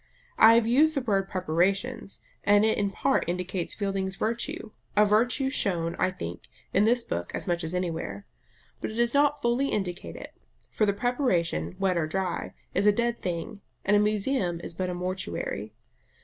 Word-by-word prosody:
I 225 +1 +9
have 230 -1 +4
used 300 +7 +4
the 275 - +1
word 195 -5 0
"preparations," 190 +6 -1 0.2
and 205 +1 +5
it 220 - +2
in 200 -1 +1
part 270 +7 +1
indicates 180 0 -2
Fielding's 195 -2 -2
virtue, 225 0 -3 0.3
a 210 - +7
virtue 245 +6 +2
shown, 170 -9 0
I 185 - +3
think, 85 - -7 0.3
in 200 +2 +4
this 240 +1 +3
book 85 - -4
as - - -4
much 175 -1 -1
as 160 +3 -3
anywhere. 165 - -3 0.5
But - - -3
it 215 - -7
does 235 0 +1
not 290 +1 +3
fully 240 +4 +2
indicate 180 -4 -3
it; - - -9 0.4
for 215 - +1
the 200 - +3
preparation, 190 - 0
wet 185 -2 +1
or 155 - 0
dry, 185 +2 -3 0.2
is 205 - +2
a - - +8
dead 235 +2 0
thing, 180 +4 -4 0.2
and 205 - +4
a - - +5
museum 210 -3 +1
is - - -6
but 185 +2 -2
a 180 - -3
mortuary. 180 - -4
195 Hz, 180 wpm, -27 LUFS, 180-235 Hz, 0.5 s, I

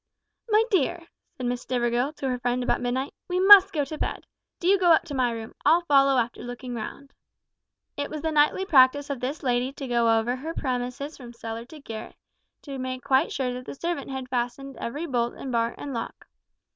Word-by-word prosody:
"My 430 +1 +5
dear," 345 -1 +1 0.3
said 255 - -4
Miss 245 0 -1
Stivergill 245 +3 0
to 275 - -4
her 250 -1 -2
friend 245 +1 -1
about 245 - 0
midnight, 255 +3 -2
"we 360 0 -1
must 390 0 +9
go 295 -5 0
to 305 +3 -7
bed. - - -3 0.3
Do 345 - -2
you 395 +1 +5
go 355 -2 +5
up - - +3
to 295 - -8
my 255 -2 +2
room; 225 -1 -6
I'll 340 +2 +5
follow 275 -3 +4
after 240 -1 -1
looking 245 +1 -7
round." 240 +5 -7 0.8
It 285 0 -3
was 305 -1 -6
the 320 - 0
nightly 300 +5 +3
practice 285 -2 +4
of 275 - -3
this 270 +5 -4
lady 250 0 +1
to 275 - -7
go 235 -2 +3
over 235 +3 0
her 320 +5 -6
premises 255 +3 -3
from 240 -3 -11
cellar 230 0 -6
to 305 +4 -12
garret, 225 -5 -8 0.5
to 275 -3 -7
make 255 -1 -4
quite 270 -1 +2
sure 255 -2 -2
that 250 0 -7
the - - -6
servant 335 -2 -3
had 265 -1 -5
fastened 250 +2 -3
every 290 +8 -4
bolt 240 -5 -1
and 265 - -6
bar 230 0 0
and 280 - -6
lock. 230 - -6
260 Hz, 210 wpm, -26 LUFS, 245-295 Hz, 0.8 s, must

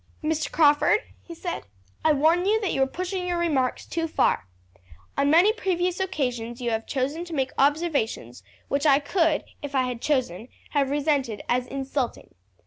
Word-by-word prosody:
"Mr. 310 0 -1
Crawford," 300 +7 +4 0.2
he 340 - -10
said, 345 +1 -4 0.4
"I 315 - +5
warn 320 +5 +3
you 435 +2 +3
that 395 - -1
you 270 - 0
are 265 - +4
pushing 365 +4 -4
your 350 -1 0
remarks 290 -7 0
too 330 0 -2
far. 200 - +1 0.7
On 280 0 +2
many 350 +8 +6
previous 365 -4 -1
occasions 250 -10 -2
you 240 -2 -1
have 225 0 -2
chosen 285 +5 -2
to 340 -2 -6
make 265 -2 0
observations 280 - 0 0.3
which 280 +2 +1
I 275 -2 +6
could, 320 +1 +1 0.2
if 285 -1 -6
I 260 - +3
had 250 -2 -4
chosen, 245 - -1 0.2
have 280 -2 +1
resented 280 -6 0
as 245 +1 0
insulting. 270 -2 -4
290 Hz, 170 wpm, -25 LUFS, 260-340 Hz, 0.7 s, many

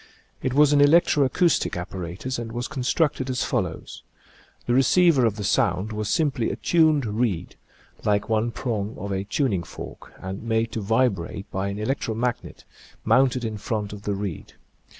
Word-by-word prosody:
It 130 0 -1
was 150 0 +5
an 145 - +5
electro 150 -1 +5
acoustic 165 - +1
apparatus 90 +8 -5
and 115 -1 -5
was 120 +2 -3
constructed 135 0 0
as 125 -1 0
follows: 95 -9 -3 0.6
The 120 - +1
receiver 135 0 +4
of 105 - -1
the 105 - -5
sound 105 -1 +1
was 105 -1 -3
simply 145 -8 +1
a - - -3
tuned 155 -5 +3
reed, 105 -5 -2 0.5
like 105 0 +1
one 110 +1 +1
prong 110 -3 -3
of 100 - -5
a 95 0 -2
tuning 105 - 0
fork, 85 - -10
and 95 +2 -6
made 115 0 0
to 110 - -3
vibrate 100 -3 0
by 95 +1 -2
an 100 0 -4
electro 110 0 -2
magnet, 120 +1 -3 0.4
mounted 125 +1 +3
ia 110 -2 -4
front 105 -1 -3
of 100 - -8
the 100 -1 -2
reed. 100 -4 -5
115 Hz, 170 wpm, -24 LUFS, 100-130 Hz, 0.6 s, was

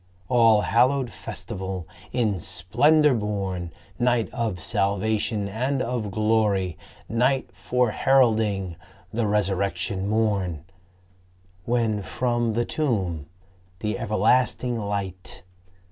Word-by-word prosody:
All 115 -3 +5
hallowed 125 +3 +2
festival, 95 -5 -6 0.2
in 110 -6 0
splendor 120 - +3
born! 100 -6 -2 0.3
Night 120 -2 +2
of 115 -7 -2
salvation 105 +1 0
and 130 +7 -1
of 120 -4 -2
glory! 105 -4 +1 0.3
Night 125 -2 +1
Fore 120 +5 0
heralding 110 -9 +2 0.4
the 115 -1 0
Resurrection 100 -1 0
morn! 100 -8 0 1.0
When 115 -3 +1
from 120 +2 -1
the 120 +2 0
tomb 95 - -1 0.5
the 105 +2 -2
everlasting 120 +3 +2
Light 100 -3 -4
110 Hz, 95 wpm, -25 LUFS, 95-120 Hz, 1.0 s, All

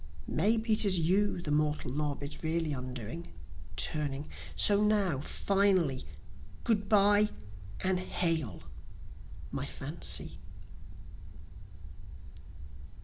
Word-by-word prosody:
May 220 +3 +1
be 220 0 0
it 215 - +5
is 190 -4 +3
you 185 +2 +1
the 150 - -3
mortal 150 -3 0
knob 145 -1 -2 0.2
really 160 -1 -1
undoing, 125 +4 -6 0.4
turning 145 - -1 0.3
so 205 0 +6
now 200 -9 +2
finally, 185 -5 +1 0.6
Good 210 -3 0
bye 205 0 +5 0.5
and 185 -1 +1
hail! 165 - -1 0.9
my - - -4
Fancy. - - -2
170 Hz, 90 wpm, -31 LUFS, 150-205 Hz, 0.9 s, so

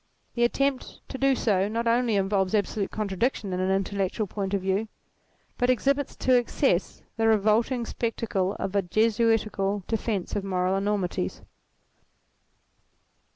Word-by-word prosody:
The 240 - +1
attempt 275 +2 0
to 265 - -6
do 270 0 +3
so 200 -5 +1
not 230 +2 -2
only 235 -1 +2
involves 195 0 +1
absolute 205 0 0
contradiction 210 0 -2
in 180 - -2
an 185 0 0
intellectual 195 +2 0
point 200 0 -3
of 195 - -1
view 195 +3 0 0.7
but 245 -1 +2
exhibits 275 +3 +1
to 255 - +2
excess 240 -5 0
the 225 0 +2
revolting 225 +3 +2
spectacle 215 -5 -2
of 195 - -4
a 200 - +4
Jesuitical 215 0 +1
defence 215 -4 -2
of 205 - -1
moral 185 -1 0
enormities. 195 - -2
210 Hz, 135 wpm, -26 LUFS, 195-235 Hz, 0.7 s, a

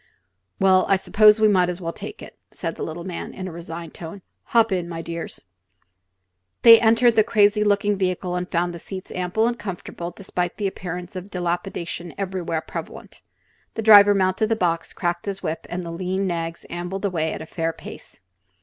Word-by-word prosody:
"Well, 190 -1 +4
I 195 - +6
suppose 210 +2 +5
we 215 - +5
may 185 -4 +4
as 180 0 -3
well 170 -2 -4
take - - -8
it," - - -12
said - - -4
the - - -9
little 165 +2 -5
man, 180 -1 -6
in 185 - -5
a - - -6
resigned 165 0 -8
tone. 175 +3 -9 0.2
"Hop 230 -2 +3
in, 180 -2 -1
my 165 -1 -5
dears." 170 0 -6 1.2
They 230 -1 +10
entered 230 +1 +4
the 215 - +6
crazy 210 -1 +3
looking 205 0 +2
vehicle 185 -1 -1
and 180 0 -3
found 175 0 0
the 170 - -7
seats 185 +2 -8
ample 185 +5 0
and 240 0 -2
comfortable 175 -3 -6
despite 180 -1 -4
the 205 - -2
appearance 180 -1 -5
of 185 +2 -7
dilapidation 175 -1 -4
everywhere 180 -4 -2
prevalent. 160 - -8 0.5
The 225 - -3
driver 205 -1 +8
mounted 190 +3 +1
the 225 - +2
box, 170 -5 -1
cracked 175 +1 -3
his 195 -1 -4
whip, 160 - -4
and 180 +1 -4
the 170 - -6
lean 185 +3 -2
nags 165 -2 -3
ambled 175 +3 -4
away 160 -5 0
at - - -6
a - - -9
fair 165 0 -2
pace. - - -12
185 Hz, 190 wpm, -23 LUFS, 170-200 Hz, 1.2 s, They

